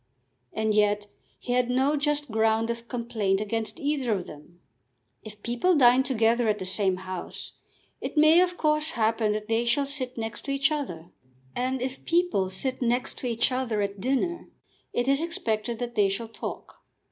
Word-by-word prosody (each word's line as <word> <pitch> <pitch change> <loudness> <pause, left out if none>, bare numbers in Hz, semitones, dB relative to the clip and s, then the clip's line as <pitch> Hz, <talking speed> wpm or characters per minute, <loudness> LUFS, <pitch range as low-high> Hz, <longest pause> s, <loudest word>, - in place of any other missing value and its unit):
And 220 0 0
yet 210 0 +2 0.3
he 245 - -3
had 250 0 +2
no 265 +4 +2
just 295 -2 -1
ground 225 +1 +2
of 235 0 -7
complaint 230 -6 -1
against 220 +7 -3
either 280 -6 0
of 185 -3 -2
them. 150 +4 -13 0.6
If 210 -1 -12
people 245 +10 +2
dine 250 -2 +6
together 235 -2 +2
at 210 - +1
the 190 - -5
same 190 0 +1
house, 185 -1 -6 0.5
it - - -6
may 310 +3 +7
of 360 -1 0
course 305 +1 +2
happen 220 -1 +2
that 210 0 -4
they 225 +1 +1
shall 240 +4 +2
sit 265 -3 -3
next 225 -1 -5
to 275 - -2
each 275 +1 +2
other. 175 - -4 0.4
And 255 0 -1
if 260 +1 -5
people 340 - +1
sit 255 +8 -3
next 245 +1 0
to 255 - -3
each 235 +2 +1
other 250 -4 -1
at 200 0 -4
dinner, 275 - -1 0.4
it 245 +1 -1
is 275 +2 +3
expected 235 -9 -2
that 240 0 -4
they 205 -3 +3
shall 220 +4 -4
talk. 225 - -7
235 Hz, 180 wpm, -27 LUFS, 215-275 Hz, 0.6 s, may